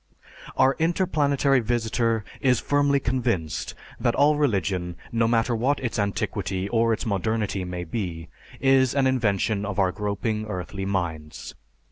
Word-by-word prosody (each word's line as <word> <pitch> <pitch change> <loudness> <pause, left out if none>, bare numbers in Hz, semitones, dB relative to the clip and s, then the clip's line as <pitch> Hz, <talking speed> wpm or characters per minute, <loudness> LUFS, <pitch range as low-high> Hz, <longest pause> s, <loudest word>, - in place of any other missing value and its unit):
Our 135 +1 +4
interplanetary 150 -5 +2
visitor 115 -1 0
is 125 -3 +3
firmly 145 -1 +2
convinced 120 - -2 0.2
that - - +1
all 150 +1 +4
religion, 95 - 0 0.2
no 115 -1 +2
matter 115 +1 +2
what 130 +6 +1
its 120 -4 -3
antiquity 100 -1 -2
or 115 +1 +2
its 110 - -1
modernity 105 -1 -1
may 90 0 -4
be, 85 -3 -4 0.3
is 135 -1 +3
an 140 -1 +3
invention 110 -5 +1
of 105 -1 -4
our 95 -2 +3
groping 105 +2 -2
earthly 95 0 -5
minds. 85 -6 -4
110 Hz, 135 wpm, -25 LUFS, 95-130 Hz, 0.3 s, Our